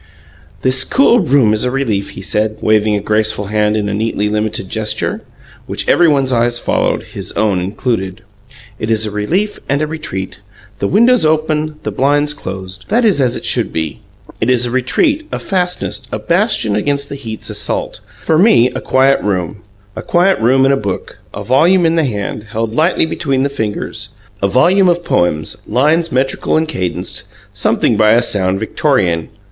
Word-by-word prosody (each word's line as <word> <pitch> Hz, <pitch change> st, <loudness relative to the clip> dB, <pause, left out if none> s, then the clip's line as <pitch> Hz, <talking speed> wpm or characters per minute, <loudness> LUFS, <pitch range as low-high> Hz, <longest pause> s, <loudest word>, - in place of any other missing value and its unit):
"This 130 Hz, +1 st, +4 dB
cool 245 Hz, -2 st, +3 dB
room 135 Hz, -, +3 dB
is 110 Hz, -, +1 dB
a 125 Hz, -, +1 dB
relief," 115 Hz, -7 st, -1 dB
he 95 Hz, -, -7 dB
said, 110 Hz, +2 st, -1 dB
waving 110 Hz, -1 st, +3 dB
a 100 Hz, -, -1 dB
graceful 105 Hz, 0 st, 0 dB
hand 105 Hz, 0 st, +2 dB
in 105 Hz, -1 st, -1 dB
a 100 Hz, -, -2 dB
neatly 105 Hz, 0 st, -1 dB
limited 105 Hz, -1 st, -1 dB
gesture, 110 Hz, +2 st, -2 dB, 0.5 s
which -, -, -4 dB
everybody's 140 Hz, -6 st, +3 dB
eyes 120 Hz, 0 st, +2 dB
followed, -, -, 0 dB
his -, -, -8 dB
own 105 Hz, -4 st, +1 dB
included. 95 Hz, +1 st, -3 dB, 0.6 s
"It 110 Hz, -, -3 dB
is 110 Hz, -1 st, +1 dB
a 105 Hz, -, -4 dB
relief 175 Hz, -, -1 dB
and 140 Hz, +1 st, +1 dB
a 155 Hz, -, 0 dB
retreat. 95 Hz, -13 st, -6 dB, 0.4 s
The -, -, 0 dB
windows 235 Hz, +3 st, +4 dB
open, 155 Hz, 0 st, 0 dB
the -, -, -3 dB
blinds 145 Hz, +2 st, +1 dB
closed 95 Hz, -6 st, -7 dB
that 235 Hz, +3 st, +2 dB
is 195 Hz, -10 st, +3 dB
as 125 Hz, -2 st, +1 dB
it -, -, -8 dB
should -, -, +1 dB
be. 80 Hz, -2 st, -3 dB, 0.4 s
It 110 Hz, -, +1 dB
is 125 Hz, -1 st, +2 dB
a 120 Hz, -, -3 dB
retreat, 295 Hz, -, +1 dB
a -, -, -2 dB
fastness, 180 Hz, -2 st, -2 dB
a -, -, -2 dB
bastion 170 Hz, -, 0 dB
against 140 Hz, +6 st, -1 dB
the -, -, -5 dB
heat's 115 Hz, -6 st, -7 dB
assault. -, -, -3 dB, 0.2 s
For 160 Hz, -1 st, +2 dB
me, 150 Hz, -, +5 dB
a -, -, -5 dB
quiet 135 Hz, +1 st, +3 dB
room 95 Hz, -2 st, -2 dB, 0.4 s
a 110 Hz, -, -5 dB
quiet 180 Hz, +8 st, +2 dB
room 130 Hz, +4 st, +3 dB
and 135 Hz, -, +3 dB
a -, -, +2 dB
book, 100 Hz, -5 st, -5 dB
a -, -, -6 dB
volume 170 Hz, +8 st, +3 dB
in 165 Hz, -, +3 dB
the 165 Hz, -2 st, +2 dB
hand, 105 Hz, -2 st, -4 dB
held 110 Hz, +1 st, -3 dB
lightly 160 Hz, +5 st, +2 dB
between 140 Hz, -5 st, -1 dB
the 140 Hz, -, 0 dB
fingers. 110 Hz, -3 st, -4 dB, 0.3 s
A 100 Hz, -, +2 dB
volume 180 Hz, -, +4 dB
of 175 Hz, 0 st, 0 dB
poems, 80 Hz, -, 0 dB
lines 155 Hz, +8 st, +1 dB
metrical 135 Hz, +4 st, 0 dB
and 160 Hz, 0 st, 0 dB
cadenced; 90 Hz, -, -4 dB, 0.3 s
something 105 Hz, +2 st, +1 dB
by 110 Hz, 0 st, +5 dB
a 120 Hz, +1 st, +3 dB
sound 95 Hz, -4 st, 0 dB
Victorian. 100 Hz, -, 0 dB
120 Hz, 180 wpm, -15 LUFS, 105-155 Hz, 0.6 s, me